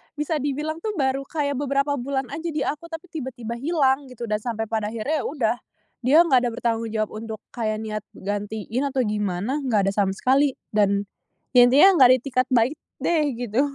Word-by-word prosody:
bisa 300 +1 -1
dibilang 300 +3 -2
tuh 430 -1 -2
baru 270 0 +1
kayak 285 -3 -1
beberapa 280 0 0
bulan 265 0 -2
aja 335 +1 -4
di 300 -2 -1
aku, 300 +3 -3
tapi 325 +3 -7
tiba-tiba 245 -6 -5
hilang 280 -3 +1
gitu 240 -1 -8
dan 210 0 0
sampai 225 -2 -3
pada 215 -2 0
akhirnya 270 +7 -2
ya - - -6
udah, 240 -6 0 0.5
dia 275 +5 +5
nggak 265 -7 +4
ada - - 0
bertanggung 230 -1 -1
jawab 215 -1 -1
untuk 220 -1 -6 0.2
kayak 215 -2 -1
niat 215 -1 -4
gantiin 205 +5 -3
atau 265 -1 0
gimana, 210 +5 -1
nggak 210 -6 +2
ada - - 0
sama 195 -2 +2
sekali. 270 +3 +2 0.2
Dan, 200 -1 +2 0.5
ya 245 - +9
intinya 335 +9 +6
nggak 255 - +9
ada 255 - +8
itikat 255 0 0
baik 250 +5 +3 0.3
deh, 330 -2 +2
gitu. 240 +1 0
255 Hz, 190 wpm, -24 LUFS, 220-285 Hz, 0.5 s, ya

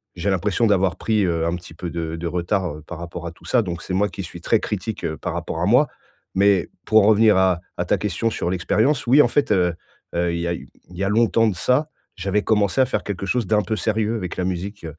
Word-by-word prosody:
j'ai 90 +3 -2
l'impression 100 +5 +1
d'avoir 95 -3 +2
pris, 110 -3 +1
heu, 85 -2 0
un 85 +1 0
petit 85 -2 -10
peu 85 +1 -5
de 80 -1 -3
de 85 +1 -4
retard 90 -2 -2
par 90 - -7
rapport 85 0 -6
à - - -5
tout - - -19
ça, 125 - +3
donc 85 -2 -5
c'est 90 - -5
moi 100 +2 +2
qui 95 - -6
suis 85 0 -9
très 110 - +2
critique 105 -1 -3
par - - -4
rapport - - -4
à - - +2
moi - - +5 0.5
mais 100 -2 +3 0.2
pour 110 -1 +5
en - - +4
revenir 110 -1 +5
à 95 -2 +3 0.2
à - - -1
ta - - +2
question 105 +3 -1
sur 85 - -2
l'expérience, 110 +10 +1
oui, 140 +5 +7
en - - +4
fait, 145 -4 +1
heu 90 -4 +3 0.4
heu, 85 0 +1
il 85 - -2
y 85 - -2
a 85 - 0
heu, - - -4 0.3
il 90 - -12
y 100 - -2
a 100 - +1
longtemps 115 +1 +3
de 100 - 0
ça, 130 - +1 0.3
j'avais 100 +2 -1
commencé 105 +2 +1
à - - +5
faire - - -2
quelque 95 -2 -4
chose 120 -2 0
d'un 105 -1 +2
peu 110 - -2
sérieux 110 +3 0
avec 90 -5 -4
la 90 - -1
musique. 95 +1 -4
95 Hz, 255 wpm, -22 LUFS, 85-110 Hz, 0.5 s, oui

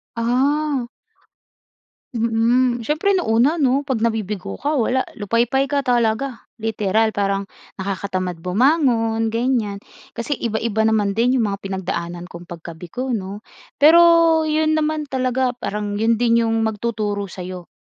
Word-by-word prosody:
Ah. 265 +3 0 1.3
Mm, 235 +2 +1
siyempre, 325 - +1
nung 360 - +1 0.2
una, 290 +7 +4
'no? 280 -2 +1
'Pag 235 -4 -1
nabibigo 210 -4 -2
ka 295 +2 -1
wala, 260 0 +1 0.2
lupaypay 235 +6 +1
ka 285 - +2
talaga, 240 0 0 0.2
literal, 220 0 0
parang 195 -1 -1 0.3
nakakatamad 185 -2 -3
bumangon, 225 - +2
ganyan. 230 -4 0 0.3
Kasi 240 +5 -3
iba-iba 220 -1 -1
naman 215 -2 +1
din 250 +3 +2
'yong 225 - +2
mga 200 0 -5
pinagdaanan 175 -2 -4
kong 175 -1 -12
pagkabigo, 175 +10 -5
'no? 195 0 -5 0.4
Pero 330 +1 +6
'yon 310 0 +1
naman 310 -1 -1
talaga 255 -1 0
parang 210 -3 -4
'yon 225 +1 +1
din 235 -1 +3
'yong 225 0 +1
magtuturo 210 -3 -2
sa'yo 180 -1 -8
230 Hz, 130 wpm, -20 LUFS, 205-265 Hz, 1.3 s, Pero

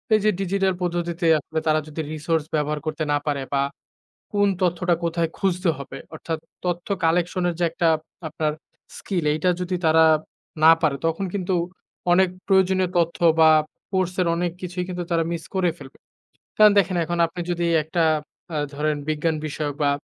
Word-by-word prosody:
এই - - +3
যে - - +6
ডিজিটাল 195 0 +1
পদ্ধতিতে 175 0 -2
আসলে 160 +2 -4
তারা 155 0 +4
যদি 155 +1 -5
রিসোর্স 155 0 -1
ব্যবহার 150 0 0
করতে 155 0 -2
না - - +3
পারে 145 -2 0
বা 140 - +2 0.7
কোন 205 0 +3
তথ্যটা 175 0 +2
কোথায় 165 0 0
খুঁজতে 185 -2 0
হবে। 135 0 -8 0.2
অর্থাৎ, 160 0 -4 0.3
তথ্য 175 0 -2 0.2
কালেকশন 175 +2 +1
এর 170 - -3
যে - - +1
একটা 170 0 0 0.4
আপনার 155 -1 -1 0.4
স্কিল 180 -6 -3
এইটা 155 +4 +1
যদি 180 0 -2
তারা 160 0 +6 0.6
না 160 - +9
পারে, 150 -3 +2
তখন 165 +4 -1
কিন্তু 185 -2 -1 0.6
অনেক 190 +1 +5 0.2
প্রয়োজনীয় 190 -1 +3
তথ্য 170 -1 +1 0.2
বা 160 - +8 0.4
কোর্স 185 -2 0
এর 180 - +1
অনেক 175 0 -1
কিছুই 180 0 -3
কিন্তু 180 -1 -3
তারা 165 -1 +2
মিস 165 -1 -3
করে 185 -2 +2
ফেলবে। 135 - -13 0.6
কারণ 215 -1 +8
দেখেন 195 -2 0
এখন 175 +2 -2
আপনি 175 +2 -6
যদি 175 0 -1 0.2
একটা 165 +2 0 0.5
আ - - 0 0.2
ধরেন 150 +1 0
বিজ্ঞান 155 +1 0
বিষয়ক 145 -1 -3
বা 145 - +3
170 Hz, 170 wpm, -23 LUFS, 155-180 Hz, 0.7 s, না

